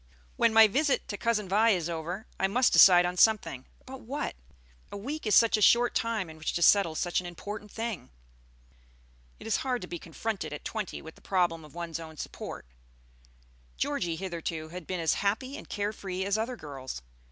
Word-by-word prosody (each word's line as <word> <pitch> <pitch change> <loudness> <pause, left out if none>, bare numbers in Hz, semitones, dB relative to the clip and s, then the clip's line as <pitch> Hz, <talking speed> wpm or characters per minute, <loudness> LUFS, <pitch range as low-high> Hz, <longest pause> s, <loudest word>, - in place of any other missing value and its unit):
"When 230 - +3
my 225 0 +8
visit 275 +7 +1
to 205 - -3
Cousin 220 -3 0
Vi 215 +4 +4
is 180 -6 +1
over, 170 +5 -4
I 190 - +3
must 245 +6 +2
decide 175 -2 +8
on 180 +1 -2
something; 195 - +2 0.2
but 265 0 -9
what? 275 +6 -4 0.6
A - - -5
week 275 +6 -5
is 210 - +4
such 230 -1 +5
a - - -3
short 240 +3 +5
time 230 -5 -1
in 160 0 -12
which 155 - -2
to 170 - 0
settle 195 -5 +5
such 175 +2 0
an 180 - -7
important 205 +4 -7
thing." 225 -2 -5 1.3
It - - -11
is 225 - +1
hard 255 -2 -1
to - - -6
be 175 - -6
confronted 170 -1 -4
at 150 - -8
twenty 215 -4 -4
with 160 - -10
the - - -21
problem 175 -4 0
of 150 +1 -15
one's 170 -2 -4
own 160 -1 -10
support. - - -7 1.1
Georgie 165 - -1
hitherto 165 -3 -5
had 180 -1 -8
been 185 -1 -3
as 165 -2 +2
happy 225 +7 -1
and - - -10
care 205 +1 -2
free 190 -2 -4
as 200 0 +1
other 225 +3 -2
girls. 135 - -8
195 Hz, 200 wpm, -29 LUFS, 165-225 Hz, 1.3 s, my